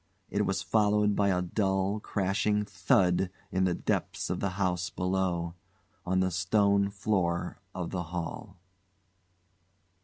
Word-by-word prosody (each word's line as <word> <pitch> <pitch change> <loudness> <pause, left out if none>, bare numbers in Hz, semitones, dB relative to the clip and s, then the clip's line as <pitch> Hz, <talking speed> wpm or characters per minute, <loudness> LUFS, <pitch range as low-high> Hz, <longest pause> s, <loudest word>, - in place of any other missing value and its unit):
It - - +1
was 95 +1 -1
followed 105 -1 +3
by 100 - +2
a 90 -1 +1
dull, 95 +2 0
crashing 105 +1 0
thud 90 -2 +2 0.2
in 95 0 +2
the 90 -2 +1
depths - - -2
of - - -2
the 100 - 0
house 90 -1 0
below 90 -2 -1 0.5
on 95 +1 +2
the 95 0 +1
stone 100 +2 +2
floor 100 -4 -1 0.2
of 90 -2 -4
the 90 - -2
hall. 90 +4 -6
95 Hz, 130 wpm, -29 LUFS, 90-100 Hz, 0.5 s, followed